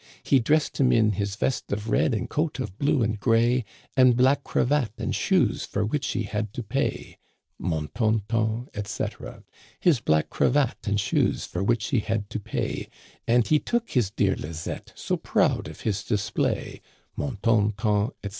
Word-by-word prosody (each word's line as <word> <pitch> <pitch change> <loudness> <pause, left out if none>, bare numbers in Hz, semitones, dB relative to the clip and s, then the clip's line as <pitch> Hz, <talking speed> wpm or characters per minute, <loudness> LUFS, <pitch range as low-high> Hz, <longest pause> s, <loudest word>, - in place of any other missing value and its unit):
He 135 - +4
dressed 150 +6 +1
him 130 -2 +4
in 110 -2 +4
his 100 0 -2
vest 130 +4 -2
of 105 +2 -3
red 125 - +2
and 105 - -2
coat 150 -2 -1
of 105 -7 -5
blue 140 -3 +2
and 110 -1 -1
gray, 120 +1 +3 0.3
And 130 -3 +5
black 135 +3 +4
cravat, 130 -4 +1
and - - -2
shoes - - +2
for 105 +1 -2
which 140 +7 -1
he - - -1
had 105 0 -3
to 120 - -4
pay: 135 +7 -3 0.4
Mon 80 -3 -2
ton 110 -2 +1
ton, 115 +1 0
etc. 105 -1 -5 0.2
" - - -26
His 150 -8 +3
black 80 -6 +1
cravat, 140 -7 +1
and 100 0 +1
shoes 100 - +1
for 90 - -3
which 115 +1 +1
he 130 - +2
had 110 -1 -2
to - - -2
pay; 105 - -3 0.4
And 120 0 +4
he 155 - +4
took 235 +6 -2
his 120 -7 +2
dear 100 -2 +1
Lizett', 80 +2 -6
so - - -2
proud - - +1
of - - -10
his 100 -2 -1
display: 110 0 -1 0.3
Mon 135 -6 -3
ton 110 -2 +3
ton, 105 -1 +1
etc. 100 - -3
110 Hz, 185 wpm, -26 LUFS, 105-125 Hz, 0.4 s, And